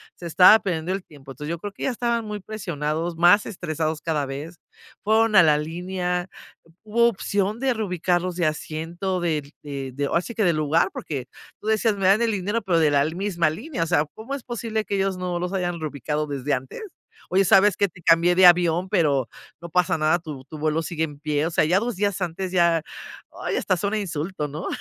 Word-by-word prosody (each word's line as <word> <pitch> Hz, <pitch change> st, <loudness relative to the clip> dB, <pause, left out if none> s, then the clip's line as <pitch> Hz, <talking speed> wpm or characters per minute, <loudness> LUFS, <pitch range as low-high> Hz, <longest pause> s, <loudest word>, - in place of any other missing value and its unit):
se 175 Hz, -, -11 dB
estaba 180 Hz, +6 st, +7 dB
perdiendo 175 Hz, -3 st, -2 dB
el 195 Hz, -1 st, -4 dB
tiempo, 140 Hz, -3 st, -13 dB
entonces, 150 Hz, +3 st, -7 dB
yo 170 Hz, -, -4 dB
creo 205 Hz, +4 st, -6 dB
que -, -, -9 dB
ya -, -, +1 dB
estaban 235 Hz, -1 st, -1 dB
muy 210 Hz, -1 st, -5 dB
presionados, 170 Hz, -5 st, -3 dB
más 175 Hz, +5 st, +5 dB
estresados 160 Hz, -4 st, -3 dB
cada 155 Hz, -3 st, -1 dB
vez, 145 Hz, +5 st, -7 dB, 0.5 s
fueron 220 Hz, +1 st, +3 dB
a 190 Hz, -, +9 dB
la 150 Hz, -2 st, +4 dB
línea, 180 Hz, +3 st, -3 dB, 0.5 s
hubo 235 Hz, +2 st, +3 dB
opción 205 Hz, 0 st, -2 dB
de 265 Hz, 0 st, +1 dB
reubicarlos 180 Hz, -3 st, -1 dB
de 175 Hz, -, +1 dB
asiento, 165 Hz, +5 st, -3 dB
del 155 Hz, -4 st, -2 dB
de 140 Hz, -2 st, -5 dB
de 140 Hz, +2 st, -2 dB
ahora 170 Hz, -, +1 dB
sí 235 Hz, -, -8 dB
que 220 Hz, -, +1 dB
del 170 Hz, -2 st, +3 dB
lugar, 155 Hz, +2 st, +2 dB
porque 135 Hz, -5 st, -5 dB, 0.3 s
tú -, -, -9 dB
decías 220 Hz, 0 st, +2 dB
me 195 Hz, -2 st, 0 dB
dan 200 Hz, +4 st, +5 dB
el 230 Hz, -1 st, +2 dB
dinero 205 Hz, +3 st, -1 dB
pero 175 Hz, -4 st, +2 dB
de 155 Hz, -2 st, +4 dB
la 140 Hz, -1 st, +3 dB
misma 170 Hz, 0 st, 0 dB
línea, 245 Hz, -, -4 dB
o -, -, -3 dB
sea, 155 Hz, -3 st, +2 dB
¿cómo 225 Hz, +5 st, -7 dB
es 275 Hz, -, -8 dB
posible 225 Hz, -2 st, -3 dB
que 200 Hz, -, -2 dB
ellos 195 Hz, -1 st, 0 dB
no 180 Hz, -1 st, -3 dB
los 180 Hz, +1 st, -3 dB
hayan 175 Hz, -3 st, -2 dB
reubicado 150 Hz, 0 st, -3 dB
desde 145 Hz, 0 st, -2 dB
antes?, 130 Hz, 0 st, -4 dB, 0.5 s
oye, 195 Hz, +2 st, +3 dB
¿sabes 195 Hz, +3 st, +5 dB
que?, 200 Hz, -, +3 dB
te 180 Hz, +1 st, -17 dB
cambié 165 Hz, +1 st, +4 dB
de 185 Hz, 0 st, +6 dB
avión 175 Hz, +1 st, +4 dB
pero 145 Hz, -, +1 dB, 0.3 s
no 170 Hz, -, -8 dB
pasa 180 Hz, 0 st, +1 dB
nada 155 Hz, +2 st, +3 dB
tu 150 Hz, -5 st, -8 dB
tu 155 Hz, +3 st, -10 dB
vuelo 155 Hz, +1 st, 0 dB
sigue 160 Hz, -1 st, -3 dB
en 145 Hz, -2 st, -11 dB
pie, 150 Hz, 0 st, -1 dB
o -, -, -4 dB
sea, 155 Hz, -, +2 dB
ya 175 Hz, +4 st, +3 dB
2 235 Hz, +1 st, -3 dB
días 200 Hz, -1 st, 0 dB
antes 180 Hz, +1 st, -3 dB
ya, 170 Hz, -2 st, +3 dB, 0.6 s
ay, -, -, -1 dB
hasta 185 Hz, -, +1 dB
es 180 Hz, -, -7 dB
un 200 Hz, -, -1 dB
insulto, 170 Hz, -5 st, -3 dB
¿no? 150 Hz, +5 st, -6 dB
175 Hz, 220 wpm, -23 LUFS, 155-200 Hz, 0.6 s, a